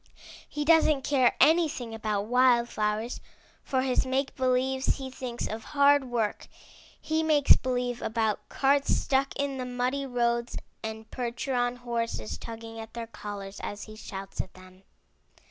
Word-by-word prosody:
He 295 Hz, -1 st, -3 dB
doesn't 310 Hz, -3 st, +5 dB
care 260 Hz, -4 st, +3 dB
anything 295 Hz, -6 st, +3 dB
about 215 Hz, -2 st, -1 dB
wild 245 Hz, +1 st, +4 dB
flowers. 215 Hz, +3 st, -2 dB, 0.4 s
For 260 Hz, -1 st, 0 dB
his 260 Hz, -1 st, +2 dB
make 265 Hz, +1 st, -1 dB
believes 260 Hz, +1 st, +1 dB
he 265 Hz, -1 st, -6 dB
thinks 250 Hz, -2 st, -4 dB
of 220 Hz, +1 st, -5 dB
hard 285 Hz, -1 st, +4 dB
work. 235 Hz, -4 st, -2 dB, 0.5 s
He 315 Hz, +1 st, 0 dB
makes 305 Hz, -3 st, +6 dB
believe 245 Hz, -1 st, -2 dB
about 220 Hz, -1 st, -1 dB
carts 280 Hz, +1 st, +2 dB
stuck 270 Hz, 0 st, 0 dB
in 280 Hz, -1 st, -2 dB
the 255 Hz, -, -3 dB
muddy 250 Hz, +3 st, -1 dB
roads 235 Hz, -1 st, 0 dB, 0.2 s
and 220 Hz, 0 st, -6 dB
percheron 245 Hz, 0 st, -1 dB
horses 235 Hz, -, -3 dB
tugging 225 Hz, 0 st, -8 dB
at 220 Hz, 0 st, -9 dB
their 235 Hz, -1 st, -4 dB
collars 205 Hz, -3 st, -7 dB
as 205 Hz, 0 st, -5 dB
he 215 Hz, -, -10 dB
shouts 195 Hz, -2 st, -6 dB
at 185 Hz, -, -13 dB
them. 185 Hz, 0 st, -15 dB
245 Hz, 145 wpm, -28 LUFS, 225-265 Hz, 0.5 s, makes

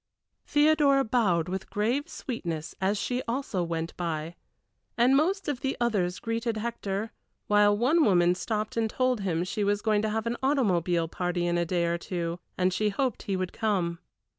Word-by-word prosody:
Theodora 295 Hz, -2 st, +4 dB
bowed 200 Hz, -9 st, +1 dB
with 190 Hz, +1 st, -4 dB
grave 235 Hz, +8 st, 0 dB
sweetness 175 Hz, -, -5 dB
as 195 Hz, +2 st, +1 dB
she 250 Hz, +5 st, -1 dB
also 235 Hz, -6 st, -2 dB
went 165 Hz, -1 st, -3 dB
by, 165 Hz, -2 st, -3 dB, 0.6 s
and 245 Hz, +3 st, +5 dB
most 370 Hz, +7 st, +1 dB
of 285 Hz, -4 st, -2 dB
the 270 Hz, -, -1 dB
others 195 Hz, -7 st, 0 dB
greeted 230 Hz, 0 st, -2 dB
Hector, 215 Hz, -2 st, -3 dB, 0.3 s
while 205 Hz, 0 st, +4 dB
one 290 Hz, +9 st, +3 dB
woman 175 Hz, -6 st, +4 dB
stopped 215 Hz, +3 st, -3 dB
and 225 Hz, -1 st, +1 dB
told 255 Hz, 0 st, +1 dB
him 175 Hz, -3 st, 0 dB
she 200 Hz, +3 st, -2 dB
was 205 Hz, 0 st, 0 dB
going 215 Hz, -2 st, +2 dB
to 215 Hz, -, 0 dB
have 220 Hz, +1 st, -2 dB
an 235 Hz, +1 st, -1 dB
automobile 180 Hz, -, +1 dB
party 175 Hz, +1 st, -2 dB
in 175 Hz, 0 st, +1 dB
a 170 Hz, 0 st, +1 dB
day 175 Hz, 0 st, +1 dB
or 170 Hz, 0 st, 0 dB
two, 170 Hz, -1 st, -3 dB, 0.2 s
and 185 Hz, 0 st, +2 dB
she 210 Hz, +3 st, +1 dB
hoped 250 Hz, +3 st, -1 dB
he 195 Hz, -, -2 dB
would 185 Hz, -1 st, -3 dB
come. 185 Hz, -7 st, -1 dB
205 Hz, 180 wpm, -28 LUFS, 175-240 Hz, 0.6 s, and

